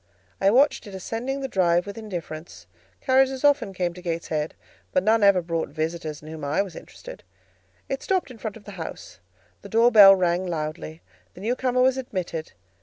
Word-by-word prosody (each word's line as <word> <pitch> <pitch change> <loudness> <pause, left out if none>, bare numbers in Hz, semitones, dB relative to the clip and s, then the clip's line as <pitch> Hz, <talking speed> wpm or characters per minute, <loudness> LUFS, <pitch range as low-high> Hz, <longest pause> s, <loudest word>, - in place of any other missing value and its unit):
I 195 - +5
watched 265 +2 +3
it 195 - -9
ascending 240 +8 -4
the 270 - -2
drive 175 -6 +2
with 200 - -7
indifference; 165 - -7 0.4
carriages 265 0 +2
often 285 -8 +3
came 180 -2 -2
to 180 - -11
Gateshead, 165 -3 -3 0.4
but 185 - +1
none 220 +2 +3
ever 200 -3 +5
brought 165 -1 -2
visitors 155 0 -4
in - - -11
whom 155 -1 -8
I 145 +7 +1
was 185 -5 -10
interested; - - -11 0.7
it 270 - -3
stopped 370 -8 -1
in 235 - -13
front 220 0 -5
of 215 - -17
the 205 - -10
house, 160 - -8 0.4
the - - -11
door 230 +2 +4
bell 200 -3 +9
rang 180 0 0
loudly, 155 - -5 0.3
the 180 - -11
new 230 +5 0
comer 255 -1 +1
was 260 0 +3
admitted. 180 -10 -5
195 Hz, 185 wpm, -24 LUFS, 165-245 Hz, 0.7 s, bell